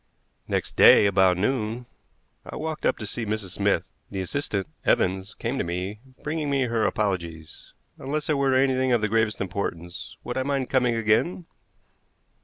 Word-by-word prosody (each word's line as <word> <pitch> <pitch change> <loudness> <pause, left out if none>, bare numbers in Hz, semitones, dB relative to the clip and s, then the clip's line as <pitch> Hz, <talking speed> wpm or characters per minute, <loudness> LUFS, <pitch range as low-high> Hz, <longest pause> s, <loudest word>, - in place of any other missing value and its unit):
Next - - -2
day - - +8
about 95 -2 +4
noon 115 +2 -1 0.6
I - - -9
walked 155 0 -2
up - - +1
to 110 - -6
see 115 +3 -4
Mrs. 105 -3 -3
Smith. 100 -2 0 0.2
The 95 - -4
assistant, 100 -1 -2 0.2
Evans, 95 +2 +1
came 125 +4 -3
to - - +1
me, 90 +5 -4 0.2
bringing 150 -1 -2
me 140 -1 +2
her 115 -3 0
apologies. 85 -6 -3 0.3
Unless 145 +2 -3
it 155 - +2
were 135 -2 +2
anything 130 -1 +2
of 120 - +3
the 110 - +1
gravest 110 0 +1
importance, 90 -3 -5
would - - -3
I - - +1
mind 135 -1 -1
coming 125 -3 +2
again? 115 +11 +1
110 Hz, 165 wpm, -25 LUFS, 95-130 Hz, 0.6 s, day